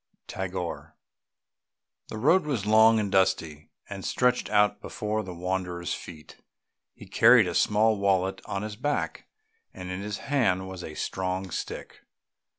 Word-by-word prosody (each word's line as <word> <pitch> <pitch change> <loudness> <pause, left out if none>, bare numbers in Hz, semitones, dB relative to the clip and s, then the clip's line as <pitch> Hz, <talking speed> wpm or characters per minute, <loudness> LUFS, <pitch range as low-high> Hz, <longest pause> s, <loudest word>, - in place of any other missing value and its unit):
TAGORE. 90 -2 -5 1.1
The - - -7
road 155 +8 +3
was 120 -9 -2
long 110 +1 +6
and 100 -2 -2
dusty, 95 -6 0 0.2
and 100 -1 -7
stretched 125 0 +1
out 105 0 +2
before 105 0 -3
the 95 -3 -8
wanderer's 90 -1 -3
feet. 80 -2 -10 0.6
He - - -12
carried 120 -5 +6
a 90 - -3
small 105 +3 +2
wallet 95 -1 +1
on 100 +1 -4
his 105 -1 -5
back, 145 +6 -3 0.5
and 90 0 -7
in 90 +1 -4
his 105 0 -4
hand 95 -10 0
was 95 -1 -8
a 80 - -8
strong 95 +1 -3
stick. - - -6
95 Hz, 145 wpm, -27 LUFS, 90-110 Hz, 1.1 s, long